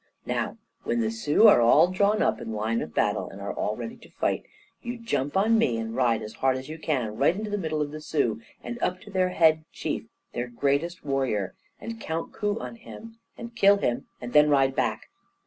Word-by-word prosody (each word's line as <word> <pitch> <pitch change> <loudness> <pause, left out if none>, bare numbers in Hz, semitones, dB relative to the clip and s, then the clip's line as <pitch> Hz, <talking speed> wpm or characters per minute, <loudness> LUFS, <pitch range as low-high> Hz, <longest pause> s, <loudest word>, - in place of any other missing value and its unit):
Now, - - -2 0.2
when 235 - -1
the 220 -1 0
Sioux 220 -1 +4
are 165 - +7
all 145 +9 +6
drawn 200 +3 +2
up - - +1
in 110 - -5
line 110 +2 -1
of 80 - -5
battle, - - +1
and - - -11
are - - -4
all 105 - -2
ready 230 - -6
to 235 - -17
fight, - - -1 0.4
you 240 0 -5
jump 150 - -1
on 195 - +4
to 230 - +5
me, 130 - +2
and 115 0 -4
ride 120 -3 +2
as 110 0 -7
hard 130 -1 +3
as 130 - -7
you 160 +1 -7
can, 125 -9 -1
right 145 +7 +3
into 210 +1 -4
the 205 - 0
middle 155 -3 -1
of 145 - -6
the 155 0 -7
Sioux, 120 -8 0 0.2
and 240 0 -6
up 180 0 0
to 205 - -12
their 185 -1 +2
Head 160 -3 +4
Chief, - - -4 0.3
their 120 +1 -2
greatest 140 +8 -1
warrior, 130 -9 -1 0.3
and 230 0 -7
count 160 +1 -4
coup 205 0 -1
on 230 - -7
him, 230 0 -12 0.2
and 235 0 -8
kill 200 -3 +6
him, 120 -11 -1
and 120 0 -7
then 150 0 +6
ride 135 -2 +3
back. - - -1
155 Hz, 225 wpm, -26 LUFS, 125-205 Hz, 0.4 s, are